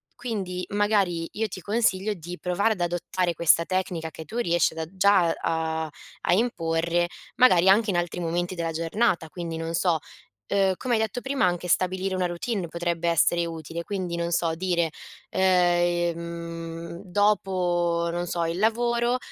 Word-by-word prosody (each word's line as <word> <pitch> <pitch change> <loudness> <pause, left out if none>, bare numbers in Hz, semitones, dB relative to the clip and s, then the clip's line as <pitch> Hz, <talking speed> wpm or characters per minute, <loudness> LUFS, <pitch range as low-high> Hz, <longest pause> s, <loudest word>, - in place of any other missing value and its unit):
quindi, 195 -7 -4
magari, 200 -5 +1
io 220 +1 -1
ti 185 -1 -8
consiglio 210 0 +1
di 175 -1 -8
provare 200 +5 +1
ad 180 - -8
adottare 175 +1 -1
questa 170 +1 +4
tecnica 175 -3 -2
che 160 - -9
tu 225 +10 -7
riesci 175 -8 +2
ad 160 - -8
a 160 - -2
già 190 -3 +4
a 160 -1 -1 0.3
a - - +2
imporre, 170 -5 +1 0.3
magari 190 -8 +6
anche 210 +3 +5
in 180 - +1
altri 175 0 -2
momenti 175 +1 -1
della 165 -1 -2
giornata. 165 +1 0
Quindi 170 -1 -5
non 165 +1 -4
so, 175 -2 +2 0.5
uhm, 195 -1 +3
come 250 -2 -1
hai 220 - +1
detto 220 +2 -2
prima 270 -2 +1
anche 180 0 -1
stabilire 185 +2 +1
una 185 -1 0
routine 175 +2 -3
potrebbe 170 0 -1
essere 170 +1 +3
utile, 165 0 -6
quindi 185 -2 -3
non 170 0 -2
so, 165 -1 +1
dire, 170 -2 0 0.4
ehm 170 -2 0
dopo, 180 -4 +1
non 175 +1 -2
so, 170 -1 -1
il 165 +1 -2
lavoro, 235 +3 +2
175 Hz, 160 wpm, -26 LUFS, 170-195 Hz, 0.5 s, magari